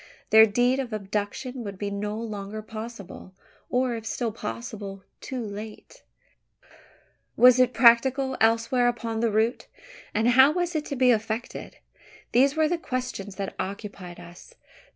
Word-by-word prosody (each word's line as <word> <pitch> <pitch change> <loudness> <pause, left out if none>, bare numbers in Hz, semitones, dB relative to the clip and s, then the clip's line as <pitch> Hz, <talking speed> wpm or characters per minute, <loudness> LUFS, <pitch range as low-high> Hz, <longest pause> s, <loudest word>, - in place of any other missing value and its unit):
There 220 0 +8
the - - -10
deed 245 +4 +2
of 250 -4 -4
abduction 210 +5 -4
would 200 -2 -7
be 200 +1 -4
no 210 +1 -3
longer 215 -1 -6
possible; 215 -4 -9 0.3
or, 250 0 +1
if 225 -1 -5
still 235 0 -2
possible, 195 - -7 0.2
too 255 -3 -5
late. 215 - -9 1.4
Was 250 +1 +7
it 250 -1 +4
practicable 260 +2 +4
elsewhere 230 +2 +3
upon 230 -2 -2
the 230 0 +1
route? 220 +3 0 0.4
And 220 +3 +1
how 265 +4 +6
was 350 0 -1
it 310 -1 -2
to 280 - -4
be 255 -1 +4
effected? 225 +1 -3 0.5
These 270 +4 +4
were 315 -1 +3
the 345 +1 -1
questions 250 - -5
that 195 0 -4
occupied 195 -3 -6
us. 175 - -14
225 Hz, 150 wpm, -26 LUFS, 205-255 Hz, 1.4 s, There